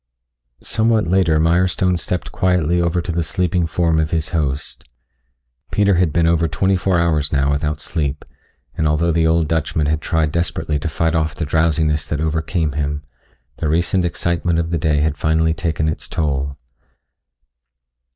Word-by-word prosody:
Somewhat 110 -1 +1
later 85 -3 +2
Mirestone 90 +3 +2
stepped 90 +1 -3
quietly 90 -2 +1
over 85 0 0
to 90 - -3
the 85 +1 0
sleeping 85 +1 0
form 80 0 +1
of 80 -1 0
his 80 -1 -1
host. 75 -6 -3 0.8
Peter 100 -1 +2
had 90 -3 +2
been 85 +2 +2
over 85 0 +2
twenty 95 +3 +1
four 90 0 +1
hours 80 -4 +1
now 70 0 +2
without 75 +1 -1
sleep, 75 -3 -3 0.5
and 80 - 0
although 80 +3 +2
the 80 0 +2
old 80 -1 +2
Dutchman 80 -1 0
had 75 +1 0
tried 80 -2 0
desperately 80 -3 -1
to 80 - -3
fight 80 +1 0
off 80 -2 0
the 80 +1 -3
drowsiness 80 0 +1
that 75 - -2
overcame 80 0 -1
him, 75 0 -3 0.5
the 80 - -2
recent 85 +3 +1
excitement 85 0 -1
of 85 0 -1
the 85 - 0
day 75 -2 +1
had 75 -1 0
finally 80 +1 +1
taken 80 -1 -1
its 80 - -3
toll. 70 -3 -2
80 Hz, 165 wpm, -19 LUFS, 75-85 Hz, 0.8 s, later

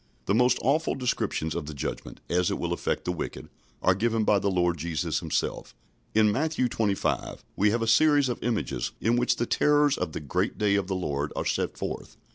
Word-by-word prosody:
" - - -38
The 100 - +1
most 125 +2 +4
awful 150 +5 +2
descriptions 120 - -1
of 75 - -4
the 75 - -6
Judgment, 70 - -5
as 90 0 +1
it - - -1
will 85 0 -2
affect - - -2
the 90 - 0
wicked, 90 - -6 0.3
are 95 - +5
given 110 +3 0
by 105 -1 +3
the 100 - 0
Lord 90 -2 +1
Jesus 80 0 -1
Himself. - - -3 0.4
In 110 -1 +5
Matthew 150 +1 0
xxv. 105 -4 -1
we 105 +2 +3
have 115 +2 0
a - - -1
series 145 +4 +5
of 125 - -3
images, 115 -3 -2
in 115 +4 +2
which 120 +1 +2
the 120 - -1
terrors 145 +2 +3
of 80 - -3
the - - -3
"great 90 +7 -2
day 105 -2 +2
of 100 -2 +1
the 95 - -1
Lord" 75 -5 -2
are - - -2
set - - -1
forth. - - -5
105 Hz, 215 wpm, -27 LUFS, 90-125 Hz, 0.4 s, are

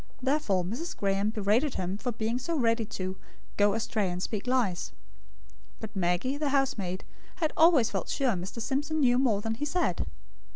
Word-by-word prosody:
Therefore 260 -9 +1
Mrs. 235 - -4
Graem 200 +1 +1
berated 220 +7 +1
him 185 +1 -2
for 245 +4 -3
being 225 +2 -1
so 330 +5 -2
ready 230 -3 +2
to 185 -2 -4 0.4
"go 205 0 +3
astray 220 -3 0
and 180 0 -3
speak 205 +4 -3
lies." 195 - 0 0.9
But 220 -1 -8
Maggie, 190 +9 0
the 300 -2 0
housemaid, 210 -10 0 0.3
had 320 -4 -1
always 320 -8 +5
felt - - -3
sure 270 -3 +1
Mr. 190 +3 -4
Simpson 290 +7 -1
knew 245 -2 +4
more 225 -7 +2
than 225 +1 -1
he 250 +6 -3
said. 295 - 0
225 Hz, 170 wpm, -29 LUFS, 195-270 Hz, 0.9 s, always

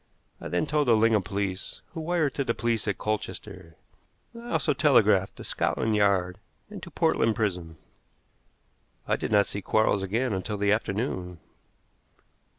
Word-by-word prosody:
I - - -5
then 90 - 0
told 150 -1 0
the 115 - +6
Lingham 110 -1 +3
police, 95 -1 -4
who 165 - -7
wired 160 -4 0
to 140 - -1
the 115 -3 -1
police 115 0 -1
at 105 - -1
Colchester, 95 -4 -5 0.6
and 235 - -10
I 240 - -9
also 150 - +2
telegraphed 105 -9 +3
to - - -10
Scotland 110 -1 -1
Yard 95 -3 +1 0.3
and - - -8
to - - -9
Portland 115 -1 +1
Prison. 90 -7 -2 1.3
I - - +2
did - - -4
not 100 -1 +5
see 100 - -5
Quarles 110 -1 +2
again 110 +5 -1
until 100 +3 -3
the 100 0 +1
afternoon. 100 -5 -2
105 Hz, 155 wpm, -27 LUFS, 95-115 Hz, 1.3 s, the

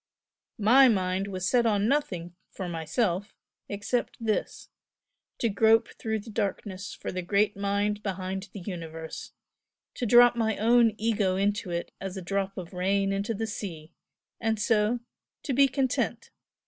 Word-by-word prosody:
MY 250 +5 +6
mind 190 -3 +1
was 185 -2 -3
set 240 +1 +3
on 205 -1 +2
nothing 185 - -1 0.2
for 185 - -6
myself 175 +4 -1 0.3
except 205 +4 -2
this 220 -2 -2 0.7
to 235 - +1
grope 220 +1 +4
through 220 -1 -3
the 220 +2 -9
darkness 200 -2 -3
for - - -5
the 185 - -3
Great 200 +4 +1
Mind 200 +1 0
behind 190 0 -4
the 200 - -8
Universe 165 -3 -7 0.6
to 245 - -3
drop 240 +2 +7
my 220 -2 0
own 230 0 +4
'ego' 210 -4 +1
into 200 0 0
it, 170 0 -3
as 195 0 -5
a - - -4
drop 195 +1 -2
of 180 0 -7
rain 195 +2 +1
into 200 +3 -2
the 225 +2 -2
sea 170 -7 -7 0.5
and 225 -2 0
so 220 +2 +2 0.4
to 275 - -2
be 275 +2 +5
content! 265 -1 -1
205 Hz, 150 wpm, -28 LUFS, 185-225 Hz, 0.7 s, drop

